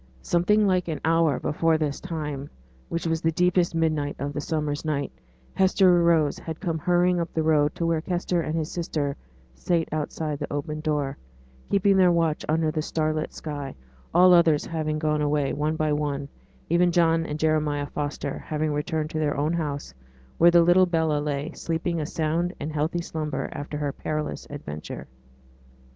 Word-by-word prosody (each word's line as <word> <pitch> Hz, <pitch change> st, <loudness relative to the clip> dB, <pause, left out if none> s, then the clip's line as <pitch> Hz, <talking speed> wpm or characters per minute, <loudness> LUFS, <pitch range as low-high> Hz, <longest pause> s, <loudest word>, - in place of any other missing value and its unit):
Something 210 Hz, +5 st, +3 dB
like 185 Hz, -2 st, +2 dB
an 160 Hz, -2 st, -3 dB
hour 165 Hz, -3 st, +3 dB
before 160 Hz, +1 st, +1 dB
this 150 Hz, -2 st, -2 dB
time, 150 Hz, -5 st, -4 dB, 0.4 s
which 170 Hz, -, -3 dB
was 165 Hz, -1 st, 0 dB
the 165 Hz, -, +2 dB
deepest 180 Hz, 0 st, +2 dB
midnight 155 Hz, -3 st, 0 dB
of 140 Hz, +2 st, -4 dB
the 145 Hz, -, -3 dB
summer's 150 Hz, -2 st, -2 dB
night, 150 Hz, -3 st, -2 dB, 0.4 s
Hester 185 Hz, -2 st, +4 dB
Rose 165 Hz, -3 st, +3 dB
had 160 Hz, -1 st, -6 dB
come 165 Hz, -4 st, -2 dB
hurrying 180 Hz, +2 st, +2 dB
up 170 Hz, 0 st, -3 dB
the 160 Hz, -, +1 dB
road 150 Hz, -1 st, +3 dB
to 170 Hz, -, -2 dB
where 165 Hz, -1 st, +1 dB
Kester 175 Hz, 0 st, -1 dB
and 160 Hz, 0 st, -2 dB
his 160 Hz, 0 st, -2 dB
sister 150 Hz, -5 st, -2 dB, 0.4 s
sate 165 Hz, -, 0 dB
outside 155 Hz, -1 st, -3 dB
the -, -, -5 dB
open 150 Hz, +1 st, -3 dB
door, 150 Hz, -3 st, -1 dB, 0.5 s
keeping 200 Hz, 0 st, +3 dB
their 180 Hz, -2 st, +6 dB
watch 165 Hz, -3 st, +1 dB
under 160 Hz, 0 st, +2 dB
the 155 Hz, 0 st, -1 dB
star 155 Hz, 0 st, -1 dB
lit 155 Hz, 0 st, -3 dB
sky, 145 Hz, -3 st, -6 dB, 0.4 s
all 180 Hz, +2 st, +6 dB
others 165 Hz, -4 st, +4 dB
having 155 Hz, -2 st, -2 dB
gone 150 Hz, -1 st, 0 dB
away, 145 Hz, -1 st, +1 dB
one 150 Hz, +2 st, -1 dB
by 155 Hz, -1 st, +1 dB
one, 145 Hz, -1 st, -2 dB, 0.4 s
even 175 Hz, +1 st, +3 dB
John 165 Hz, -1 st, +3 dB
and 150 Hz, -, -3 dB
Jeremiah 155 Hz, -2 st, +1 dB
Foster 145 Hz, -1 st, -4 dB
having 155 Hz, 0 st, -2 dB
returned 155 Hz, +1 st, -2 dB
to 155 Hz, -, -2 dB
their 145 Hz, -2 st, 0 dB
own 150 Hz, +3 st, +1 dB
house, 145 Hz, -, -3 dB, 0.5 s
where 170 Hz, -, +8 dB
the 170 Hz, 0 st, +6 dB
little 180 Hz, +2 st, +5 dB
Bella 160 Hz, -3 st, +1 dB
lay, 145 Hz, +1 st, -2 dB
sleeping 165 Hz, 0 st, -2 dB
a 150 Hz, -, -3 dB
sound 170 Hz, +2 st, -1 dB
and 150 Hz, +1 st, -4 dB
healthy 160 Hz, +3 st, -1 dB
slumber 150 Hz, -5 st, -3 dB
after 145 Hz, +1 st, -5 dB
her 145 Hz, -2 st, -2 dB
perilous 155 Hz, -1 st, -4 dB
adventure. 75 Hz, -, -7 dB
155 Hz, 180 wpm, -25 LUFS, 150-170 Hz, 0.5 s, where